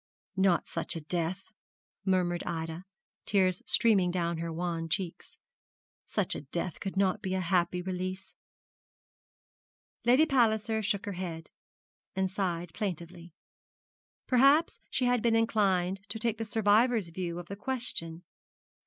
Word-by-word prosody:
'Not 190 -2 +2
such 165 - -2
a 165 - -4
death,' 175 +4 -2 0.5
murmured 180 -2 +1
Ida, 165 +1 -4 0.4
tears 185 -3 +3
streaming 200 -6 +4
down 170 -2 -1
her 165 0 -3
wan 165 0 -3
cheeks; 180 -1 -3 0.7
'such - - +1
a - - -4
death 170 +4 -4
could 195 0 -5
not 190 -2 +2
be 190 -2 -2
a - - 0
happy 180 0 +1
release.' 185 +1 -4 1.7
Lady 255 +6 +5
Palliser 220 -5 +2
shook 205 -1 0
her 205 - -3
head, 175 -3 -6 0.6
and 190 -1 0
sighed 175 -3 -2
plaintively. 175 -4 -5 0.9
Perhaps 275 +6 +4
she 255 - 0
had 245 -1 +2
been 230 0 +3
inclined 195 -5 +2
to - - -3
take 225 -1 -1
the 225 - -2
survivor's 220 -1 +3
view 170 0 -4
of 175 - -6
the 200 - -7
question. 200 -8 -1
185 Hz, 135 wpm, -30 LUFS, 175-215 Hz, 1.7 s, Lady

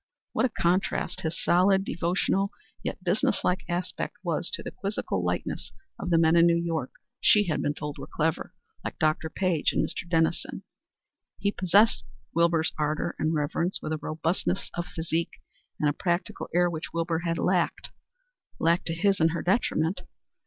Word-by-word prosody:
What - - +2
a - - +2
contrast 185 -1 0
his 165 0 -3
solid, 190 +2 +4
devotional, 185 +3 0 0.3
yet - - -5
business 185 +4 +1
like 180 +1 +1
aspect 175 +1 -3
was - - 0
to - - -8
the - - -5
quizzical 200 +1 -2
lightness - - -2 0.3
of 180 - -3
the 170 - +4
men 165 0 +5
in 170 0 +7
New 170 0 +4
York 165 -6 -1 0.3
she 210 - +5
had 160 -6 -1
been 145 - 0
told 150 -2 -5
were - - -7
clever, 160 +2 -1 0.3
like - - -5
Dr. 155 +1 +1
Page 180 -4 +1
and - - +2
Mr. 175 - -6
Dennison! 165 0 0 0.7
He 200 - +1
possessed 205 +4 +4 0.3
Wilbur's 170 -1 +3
ardor 155 +3 -1
and 155 +1 +1
reverence, 165 +5 0
with 155 - -3
a 155 - -2
robustness 165 +4 -1
of 175 0 -3
physique 165 0 -2 0.4
and 150 - +2
a 145 - +2
practical 175 +2 -2
air 175 +1 +4
which 165 -2 -4
Wilbur 165 0 0
had 165 -1 -1
lacked 180 -1 0 0.7
lacked 170 +2 +2
to 165 - -1
his 195 +3 +2
and 160 0 +3
her 170 - -2
detriment. 180 -3 +1
170 Hz, 170 wpm, -27 LUFS, 160-185 Hz, 0.7 s, in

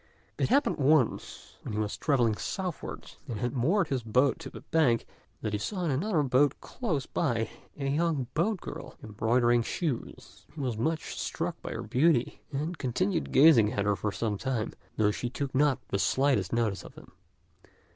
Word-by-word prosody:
It - - +1
happened 280 +4 +3
once 145 -3 +1
when - - -6
he 105 - -1
was 105 -1 -1
travelling 125 -7 +2
southwards, 185 - -5
and 115 -5 -4
had 120 +2 -1
moored 160 - +2
his 135 -2 0
boat 125 +5 +2
to - - -7
the - - -10
bank, 135 -8 +2 0.4
that 110 - -2
he 105 - 0
saw 180 - -3
in 160 - +1
another 160 +3 +1
boat 135 +1 +3
close 165 - -3
by 115 -8 -1 0.3
a 140 -1 -2
young 150 -1 +1
boat 185 +4 0
girl - - -8
embroidering 120 +3 +2
shoes. 140 +1 -4
He - - -8
was 125 -5 -1
much 160 +9 -2
struck - - -3
by - - -5
her - - -4
beauty, 140 -2 +2
and 155 +5 -3
continued 165 - -1
gazing 130 -7 +6
at 100 -4 0
her 105 0 +2
for 105 +3 -2
some 105 -1 -2
time, 125 -5 -2 0.2
though 105 -1 +3
she 120 +3 -3
took 135 +1 -4
not 140 -1 +3
the 100 - 0
slightest 130 -6 +2
notice 115 -4 0
of - - -12
him. - - -14
130 Hz, 180 wpm, -29 LUFS, 115-155 Hz, 0.4 s, gazing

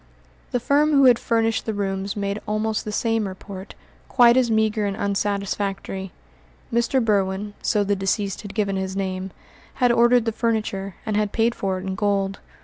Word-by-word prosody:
The 245 - 0
firm 290 +5 +2
who 275 -1 +6
had 245 -2 +6
furnished 225 -1 0
the 220 - -1
rooms 195 +1 -2
made 200 +1 -2
almost 215 +1 -1
the 210 - -3
same 225 0 0
report, 190 +1 -9 0.3
quite 240 -1 +5
as 255 -2 +3
meagre 220 -1 +1
and 200 0 -3
unsatisfactory. 200 -2 -2 0.6
Mr. 235 +1 +2
Berwin 200 -1 0
so 210 -2 +1
the 205 0 +1
deceased 195 0 -1
had 205 -3 -9
given 200 -3 0
his 190 0 -3
name 190 -1 -3 0.5
had 245 -2 +3
ordered 240 0 +4
the 225 - +1
furniture, 215 -4 -2
and 215 - -1
had 210 -1 +1
paid 230 +1 +2
for 190 -3 -2
it 185 - -7
in 190 - -2
gold. 195 0 0
205 Hz, 175 wpm, -23 LUFS, 195-225 Hz, 0.6 s, who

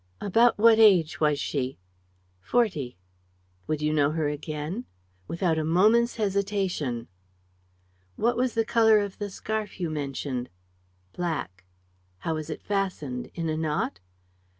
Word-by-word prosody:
"About 230 +4 +3
what 225 +1 +6
age 185 -8 +5
was 150 -2 +2
she?" 135 -3 -2 0.6
"Forty." 155 - 0 0.7
"Would 150 -1 -1
you 150 0 +1
know 145 -2 +3
her 155 -1 -1
again?" 155 - -4 0.4
"Without 170 -2 0
a - - -1
moment's 215 +9 +3
hesitation." 195 - -1 1.1
"What 235 +2 +1
was 250 -1 0
the 225 0 +2
color 220 -1 +5
of 205 -2 -2
the 205 -1 -3
scarf 215 +1 -4
you 170 -3 -2
mentioned?" 135 -4 -3 0.6
"Black." 140 - -4 0.5
"How 160 - -2
was 155 -1 -5
it - - -6
fastened? 180 -11 -2
In 165 -1 -2
a 155 - -1
knot?" 150 - -1
165 Hz, 130 wpm, -27 LUFS, 150-210 Hz, 1.1 s, what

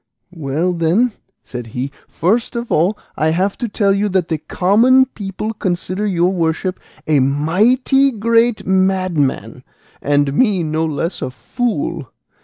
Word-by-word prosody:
"Well 160 +3 -1
then," 175 +9 +2 0.3
said 125 -2 -7
he, 135 +3 -2 0.2
"first 225 +9 0
of 235 0 -4
all, 180 +7 +2 0.2
I 155 - +1
have 185 +5 0
to 240 - -2
tell 200 -1 +2
you 205 +1 0
that 185 -3 0
the 160 -2 -1
common 230 - +3
people 215 -2 -5
consider 185 +1 -2
your 180 -2 +2
worship 170 +1 -1 0.3
a 150 -2 +3
mighty 210 - +2
great 230 0 +1
madman, 185 -6 0 0.4
and 145 -1 +1
me 200 - +2
no 155 +1 -1
less 160 +4 -3
a - - -2
fool. 170 - -3
185 Hz, 140 wpm, -18 LUFS, 160-215 Hz, 0.4 s, common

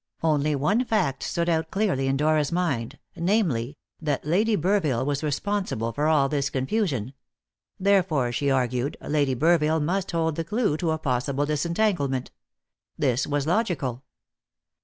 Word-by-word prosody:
Only 150 -2 +2
one 195 - +2
fact 190 - 0
stood 170 0 -1
out 160 -1 0
clearly 190 -10 0
in 135 0 +1
Dora's 150 0 +2
mind, 145 -8 -1 0.2
namely, 165 - 0 0.2
that 150 -3 -2
Lady 210 +8 +2
Burville 160 - +1
was 145 0 -1
responsible 150 - -2
for 150 +1 0
all 150 -3 +4
this 140 -1 -1
confusion; 135 - -1 0.7
therefore, 185 -10 +2
she 140 +4 0
argued, 130 +1 0
Lady 145 -3 0
Burville 160 +2 +3
must 185 +5 -1
hold 160 -2 -1
the 165 - -1
clue 210 -1 0
to 165 0 -1
a 160 - +1
possible 140 -1 -1
disentanglement. 150 - 0 0.7
This 130 -4 +1
was 145 -1 -1
logical. 160 - -1
150 Hz, 140 wpm, -25 LUFS, 135-175 Hz, 0.7 s, all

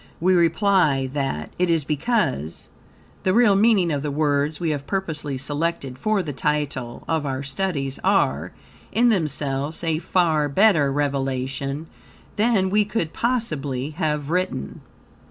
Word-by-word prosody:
We 185 +3 +3
reply 170 -5 +3
that, 135 - -2
it 180 -1 +2
is 165 -2 +2
because, 150 - -1 0.5
the 185 +1 +1
real 235 -4 +5
meaning 200 -4 +4
of 145 -2 -1
the 150 - -2
words 145 +1 0
we 165 -3 0
have 140 -1 -4
purposely 155 -8 -3
selected 145 -1 -3
for 215 -3 +1
the 150 -3 -5
title 135 -4 -2
of 160 -2 0
our 135 -1 -3
studies 140 -2 -2
are, 75 +7 +1 0.4
in 240 +3 +4
themselves, 150 - -1
a 160 -2 0
far 165 -4 +1
better 160 -4 +4
revelation 135 0 -2 0.5
than 205 -4 +2
we 210 +1 +4
could 200 -6 -3
possibly 155 - -1
have 150 -2 -2
written. 180 - -2
150 Hz, 135 wpm, -23 LUFS, 140-185 Hz, 0.5 s, real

